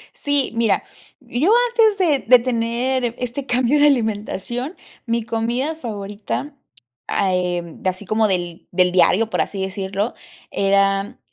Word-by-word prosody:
Sí, 285 -2 0
mira, 230 -1 +2 0.4
yo 295 - 0 0.2
antes 445 -3 +4
de 325 -7 +2
de 250 +2 +7
tener 240 +1 -1
este 250 +2 -4
cambio 255 +3 +2
de 295 - +7
alimentación, 240 - -1 0.3
mi 230 -1 -1
comida 235 +7 -1
favorita, 200 - -5 0.5
eh 180 -2 0
mm, 170 -1 -12
así 185 +2 -2
como 215 +3 +2
del 175 -3 -3
del 180 0 +3
diario, 185 +5 +4
por - - 0
así 195 - -3
decirlo, 195 +3 -2 0.4
era 195 0 +1
225 Hz, 130 wpm, -20 LUFS, 195-255 Hz, 0.5 s, de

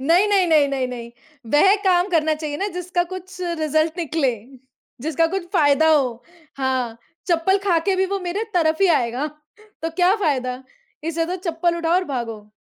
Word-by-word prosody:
नहीं, 335 +9 +4
नहीं, 390 -3 +3
नहीं, 310 -3 +4
नहीं, 270 -2 -1
नहीं। 235 -2 -7 0.4
वह 385 +7 +6
काम 360 0 +3
करना 315 -3 +2
चाहिए 300 -1 -5
ना 395 - -2
जिसका 355 0 -1
कुछ 370 0 -8 0.2
रिज़ल्ट 315 +2 +1
निकले, 305 -6 0 0.7
जिसका 315 +4 +1
कुछ 355 -3 -3
फ़ायदा 310 -2 +4
हो। 285 -4 +4 0.5
हाँ, 255 -4 -1 0.3
चप्पल 350 +3 +2
खाके 375 0 +2
भी 380 0 +2
वो 395 - 0
मेरे 405 +6 -2
तरफ़ 320 0 +2
ही 390 - +5
आएगा 245 +4 -2 0.6
तो 325 - -1
क्या 360 +3 +3
फ़ायदा? 260 - -1 0.4
इससे 330 0 -1
तो 360 +2 -3
चप्पल 340 +1 0
उठाओ 335 0 0
और 365 +1 +2
भागो। 225 -4 -5
325 Hz, 170 wpm, -21 LUFS, 280-360 Hz, 0.7 s, वह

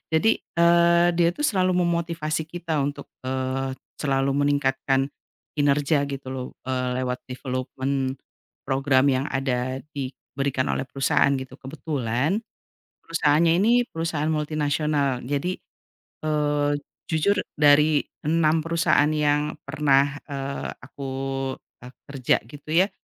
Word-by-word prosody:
Jadi, 210 +8 +3 0.2
eee, 170 0 +5
dia 170 0 +4
itu 175 - -10
selalu 185 -6 +2
memotivasi 165 -2 -1
kita 165 -4 -1
untuk, 140 0 -3 0.2
eee, 130 +1 -2 0.2
selalu 135 -1 +1
meningkatkan 135 -1 +1 0.5
kinerja, 145 0 +2
gitu, 140 -1 -6
loh, 130 -1 -4 0.2
eee, 125 -1 -1
lewat 125 0 -3
development 130 +1 -2 0.5
program 135 0 +3
yang 135 0 +2
ada 130 -1 -1 0.2
diberikan 135 0 -3
oleh - - 0
perusahaan, 135 +1 +2
gitu. 130 -1 -8
Kebetulan 140 - -2 0.6
perusahaannya 165 0 +3
ini 225 +3 +4
perusahaan 165 -4 -2
multinasional. 150 -3 0
Jadi, 145 +7 -1 0.7
eee, 150 -1 +1 0.4
jujur 180 +6 +3 0.2
dari 150 0 +5 0.2
6 155 0 +2
perusahaan 165 -2 +3
yang 150 0 +1
pernah, 140 -1 +2
eee, 140 -1 -4
aku 140 +3 -10 0.8
aku 125 +1 -12 0.2
kerja, 130 -3 +2
gitu, 145 +3 -11
ya, 180 +4 +4
145 Hz, 110 wpm, -24 LUFS, 135-155 Hz, 0.8 s, eee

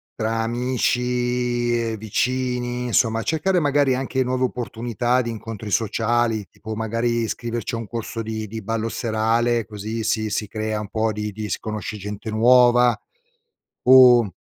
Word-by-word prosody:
tra 115 0 -1
amici, 125 0 0
ehm, 115 -1 -2
vicini, 125 +3 -1
insomma 115 -1 +1
cercare 175 +6 +1
magari 145 -3 +2
anche 130 0 -1
nuove 130 0 -1
opportunità 120 0 -1
di 115 - -3
incontri 110 -1 -7
sociali 115 0 0
tipo 110 0 -7
magari, 115 +2 -1
iscriverci 115 +1 -4
a 115 - -1
un 115 - -6
corso 115 0 -5
di 110 -1 -4
di 110 +2 -7
ballo 115 +2 -2
serale 115 +1 0
così 110 +1 -5
si 110 -1 0
si 105 0 -2
crea 110 0 -3
un 105 -1 -6
po' 110 0 0
di 105 0 -4
di 105 +1 -6
si - - -1
conosce 110 0 -5
gente 105 +2 -6
nuova. 120 +2 +5 0.9
O 125 -6 +7
115 Hz, 150 wpm, -22 LUFS, 110-125 Hz, 0.9 s, O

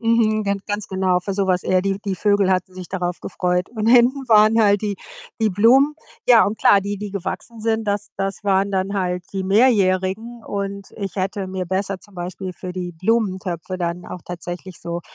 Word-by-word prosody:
mhm. 225 -2 +2
Gan 200 0 0
ganz 205 0 -3
genau, 185 -1 +1
für 195 +2 -4
so 195 0 0
was 180 -1 +1
eher 185 0 +2
die 195 0 -1
die 195 -2 -1
Vögel 200 -1 +2
hatten 185 0 0
sich 185 -2 -8
darauf 180 -2 -3
gefreut. 180 0 -1
Und 220 -2 -3
hinten 250 +2 +4
waren 215 +1 +6
halt 205 -1 +3
die 205 -2 -2 0.4
die 220 -2 +3
Blumen. 255 +9 +4 0.3
Ja 235 -2 +8
und 210 +2 -2
klar, 200 - +5
die 200 +1 -3
die 210 -1 -5
gewachsen 210 +4 -5
sind, 225 0 0
das 205 0 -1
das 195 +1 -3
waren 195 0 +2
dann 190 +1 -1
halt 180 -2 -1
die 190 -1 -2
Mehrjährigen 205 +1 +2
und 200 -1 -4
ich 200 -3 -5
hätte 195 +1 -2
mir 185 -1 -4
besser 190 +1 -2
zum 205 - -19
Beispiel 185 +1 -5
für 180 0 -7
die 180 -1 -5
Blumentöpfe 185 -2 -1
dann 175 0 -3
auch 180 - -7
tatsächlich 175 +1 -7
so 170 0 -4
195 Hz, 200 wpm, -21 LUFS, 185-215 Hz, 0.4 s, Ja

